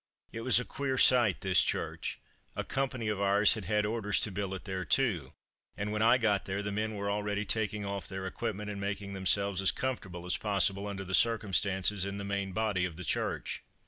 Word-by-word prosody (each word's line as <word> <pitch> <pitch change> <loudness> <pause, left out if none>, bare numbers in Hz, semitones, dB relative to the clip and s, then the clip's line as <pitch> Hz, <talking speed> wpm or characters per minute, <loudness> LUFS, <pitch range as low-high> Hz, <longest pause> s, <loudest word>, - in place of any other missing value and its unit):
It 115 - -6
was 125 0 +4
a 125 - -4
queer 135 -2 -2
sight, 120 -7 +5
this 95 -1 +4
church; - - -2 0.4
a - - -2
company 130 -4 -2
of 105 -2 -1
ours 100 +1 +5
had 110 -4 -6
had 105 +3 +1
orders 105 -2 0
to 105 - +2
billet 95 -1 -4
there 95 -2 -3
too, 110 - +1 0.4
and 105 +1 -2
when 105 0 -1
I 120 +3 +6
got 105 -5 +1
there 100 +1 -3
the 100 - -3
men 110 +1 -2
were 100 0 -2
already 105 0 -1
taking 105 -1 -1
off 100 -1 -4
their 95 0 -5
equipment 105 +1 -4
and 100 -1 -6
making 100 0 -3
themselves 95 +1 +1
as 95 - +3
comfortable 95 -5 -4
as 90 - 0
possible 100 -1 +1
under 100 -1 -5
the 95 0 -7
circumstances, 100 -3 +2
in 100 0 -2
the 100 - -5
main 100 -1 -2
body 105 -2 0
of 90 -3 -2
the 90 +1 -7
church. - - -2
100 Hz, 210 wpm, -31 LUFS, 95-110 Hz, 0.4 s, I